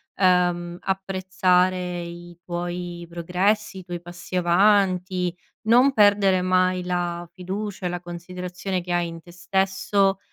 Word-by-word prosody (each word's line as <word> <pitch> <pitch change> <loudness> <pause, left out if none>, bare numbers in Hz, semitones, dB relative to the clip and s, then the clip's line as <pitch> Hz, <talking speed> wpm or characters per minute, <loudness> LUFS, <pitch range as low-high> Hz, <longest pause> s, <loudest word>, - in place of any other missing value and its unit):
ehm, 175 -2 +2
apprezzare 185 -2 +1
i 175 0 -9
tuoi 175 0 -4
progressi, 190 +4 0
i - - -10
tuoi 175 -1 -6
passi 175 +1 -9
avanti, 185 0 +2 0.3
non 245 +5 +5
perdere 200 -4 +4
mai 185 0 +2
la 175 -1 -2
fiducia 190 +1 -4
e - - -2
la 175 0 -3
considerazione 180 +2 -5
che 175 0 -4
hai 175 0 +1
in 165 0 -8
te 175 - -15
stesso, 195 +1 +1
180 Hz, 130 wpm, -24 LUFS, 175-190 Hz, 0.3 s, non